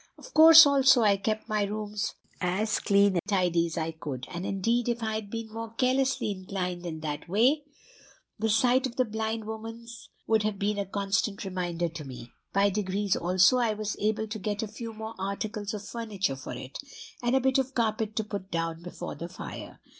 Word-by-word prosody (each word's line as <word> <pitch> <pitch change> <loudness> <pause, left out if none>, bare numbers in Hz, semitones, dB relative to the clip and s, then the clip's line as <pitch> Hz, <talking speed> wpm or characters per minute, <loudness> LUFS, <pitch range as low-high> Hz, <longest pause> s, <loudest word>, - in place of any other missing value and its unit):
"Of - - -13
course 325 +1 +10
also 270 -3 +5
I 205 -2 +5
kept 215 +2 -2
my 215 -2 0
rooms 210 +1 -3 0.2
as 200 +4 0
clean 200 -1 +4
and - - +1
tidy 180 -5 +2
as 165 - -6
I 160 0 -1
could; 140 -5 -6
and 175 +2 -4
indeed, 230 +5 0
if 235 -1 -2
I 220 0 -1
had 215 -2 -4
been 225 0 -6
more 225 0 -6
carelessly 255 -2 +1
inclined 185 -2 -4
in 160 -2 -5
that 150 +1 -5
way, 260 - +3 0.7
the 220 +1 0
sight 245 +4 +3
of 240 - -10
the 255 - +2
blind 220 0 -3
woman's 225 +2 -8 0.2
would 220 -1 +3
have 210 -1 -1
been 205 +1 -1
a 200 - -2
constant 200 +1 -1
reminder 175 -2 -2
to 160 -1 -8
me. 125 -3 -9 0.2
By 200 +1 +3
degrees 200 0 0
also 185 +7 +4
I 225 -3 +1
was 210 0 -3
able 215 +1 0
to 215 +1 -5
get 205 +2 -2
a - - -3
few 225 +2 -7
more 220 0 -7
articles 200 +1 -3
of 205 0 -7
furniture 205 - -2
for 135 - -7
it, 130 +2 -8 0.4
and 240 +1 +1
a - - +5
bit 265 +1 +2
of 265 0 -2
carpet 220 -2 0
to 220 - 0
put 200 -2 -6
down 165 -1 -2
before 175 0 -7
the 170 - -7
fire. 180 - -8
210 Hz, 200 wpm, -28 LUFS, 185-225 Hz, 0.7 s, course